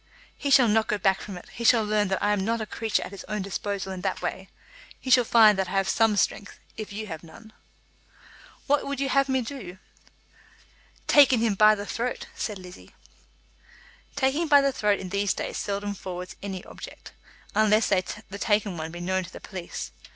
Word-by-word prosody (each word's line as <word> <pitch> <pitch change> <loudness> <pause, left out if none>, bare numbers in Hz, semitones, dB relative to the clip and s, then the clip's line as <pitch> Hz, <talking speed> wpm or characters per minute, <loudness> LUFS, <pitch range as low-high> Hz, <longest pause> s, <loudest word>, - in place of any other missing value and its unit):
"He 285 - -3
shall 265 -3 +6
not 220 +1 +2
go 210 - 0
back 195 -1 +1
from 195 -3 -7
it. - - -12
He 235 - -6
shall 230 -1 +5
learn 210 -1 +1
that 190 0 -1
I 205 0 +3
am 200 -2 0
not 230 +3 0
a 220 - -3
creature 220 0 -1
at - - -8
his 200 - -9
own 210 -2 -3
disposal 200 0 -4
in 185 -1 -6
that 195 - -2
way. 190 0 -4 0.5
He 260 - -4
shall 250 -1 +7
find 220 -3 +6
that 190 - 0
I - - -6
have 195 -1 +1
some 225 -2 +3
strength, 200 0 -1 0.2
if 215 -1 -7
you 215 +2 -5
have 160 -6 -7
none." 220 +6 -15 1.1
"What 290 0 +1
would 280 -1 -3
you 275 0 0
have 275 +1 +3
had - - -2
me 260 -1 +2
do?" 225 -8 -8 1.3
"Taken 275 -4 +6
him 225 -2 +2
by 215 +2 +6
the 205 0 -6
throat," 240 +4 -3
said 210 -3 -4
Lizzie. 180 -1 -13 1.2
"Taking 285 +4 +1
by 290 -1 +7
the 275 0 +2
throat 210 -5 +1
in 185 - -6
these 200 +1 0
days - - -4
seldom 205 0 -3
forwards 180 -2 -7
any 190 -2 -5
object, - - -11 0.4
unless 215 0 +3
the 190 -2 +3 0.4
taken 205 -4 +1
one 160 0 -5
be 175 +1 -8
known 185 +1 0
to 175 - -11
the - - -10
police. 185 -3 -7
210 Hz, 205 wpm, -26 LUFS, 190-230 Hz, 1.3 s, shall